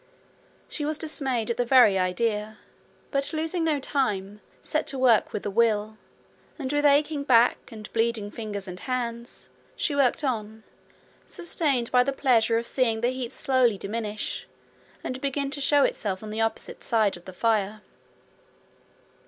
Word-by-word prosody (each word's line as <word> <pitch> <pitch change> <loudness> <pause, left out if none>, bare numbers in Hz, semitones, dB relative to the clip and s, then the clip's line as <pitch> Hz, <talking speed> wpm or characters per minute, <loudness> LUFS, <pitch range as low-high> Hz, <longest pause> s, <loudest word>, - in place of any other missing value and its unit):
She 300 - -5
was 305 +1 -1
dismayed 265 -8 -1
at 230 - -3
the 245 - +2
very 240 -6 +5
idea, 210 +3 -1 0.5
but, 275 +1 0
losing 325 +2 -1
no 310 -3 +1
time, 210 -8 -2 0.2
set 310 - -2
to 270 - -2
work 245 -4 +4
with 210 - -5
a 205 - -2
will; 215 -1 +1 0.6
and 275 -2 -3
with 290 0 +1
aching 290 +1 +2
back, 245 -1 +3
and 215 -2 -9
bleeding 225 -2 0
fingers 210 -3 -6
and 180 0 -7
hands, 235 -1 -4 0.3
she 300 - -1
worked 280 +2 +2
on, 220 -4 -3 0.6
sustained 285 -8 -1
by 250 -1 +5
the 275 +2 -1
pleasure 230 -4 +3
of 230 - -2
seeing 230 -3 0
the 240 - +2
heap 255 -2 -4
slowly 255 -6 +2
diminish 210 +1 -4 0.6
and 255 +1 -4
begin 280 0 -2
to 285 - -3
show 285 0 +4
itself 195 -5 -1
on 215 - -7
the 220 +1 -2
opposite 225 0 -3
side 220 -4 +2
of 175 - -14
the 185 - -8
fire. 215 0 0
235 Hz, 160 wpm, -26 LUFS, 215-275 Hz, 0.6 s, very